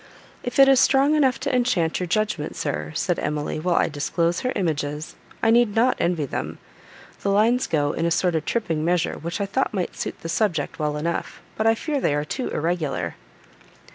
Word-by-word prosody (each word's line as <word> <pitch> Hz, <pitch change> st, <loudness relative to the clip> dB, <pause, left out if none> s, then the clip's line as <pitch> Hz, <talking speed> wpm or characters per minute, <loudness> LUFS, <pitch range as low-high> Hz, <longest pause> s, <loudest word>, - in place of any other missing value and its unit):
"If 245 Hz, -, -4 dB
it 275 Hz, 0 st, +8 dB
is 270 Hz, -2 st, +6 dB
strong 275 Hz, +3 st, +4 dB
enough 275 Hz, -4 st, +3 dB
to -, -, 0 dB
enchant 195 Hz, -10 st, +1 dB
your 180 Hz, -, -2 dB
judgment, 215 Hz, -5 st, -1 dB
sir," 75 Hz, +1 st, -3 dB
said 180 Hz, -3 st, 0 dB
Emily, 150 Hz, +1 st, -2 dB
"while 175 Hz, +2 st, 0 dB
I -, -, +3 dB
disclose 165 Hz, +3 st, -1 dB
her 255 Hz, -, -1 dB
images, 150 Hz, -4 st, -2 dB, 0.3 s
I 225 Hz, -, +5 dB
need 235 Hz, -3 st, +3 dB
not 245 Hz, +3 st, +3 dB
envy 170 Hz, -4 st, 0 dB
them. -, -, -4 dB, 0.6 s
The 200 Hz, -, -1 dB
lines 225 Hz, +5 st, +3 dB
go 145 Hz, -2 st, +1 dB
in 165 Hz, -, -1 dB
a -, -, +2 dB
sort 175 Hz, +1 st, +1 dB
of 160 Hz, -1 st, 0 dB
tripping 165 Hz, -9 st, -1 dB
measure, 175 Hz, 0 st, +1 dB
which 170 Hz, +5 st, -4 dB
I 200 Hz, -, 0 dB
thought 215 Hz, +3 st, -1 dB
might 185 Hz, -2 st, -2 dB
suit -, -, -5 dB
the -, -, -5 dB
subject 165 Hz, -3 st, -1 dB
well 150 Hz, -1 st, -1 dB
enough, 170 Hz, +3 st, -3 dB, 0.2 s
but 220 Hz, -, +1 dB
I 225 Hz, -, +5 dB
fear 290 Hz, +3 st, -2 dB
they 145 Hz, -, +1 dB
are 145 Hz, 0 st, -1 dB
too 255 Hz, -, -3 dB
irregular." 150 Hz, -, -2 dB
175 Hz, 200 wpm, -23 LUFS, 155-225 Hz, 0.6 s, it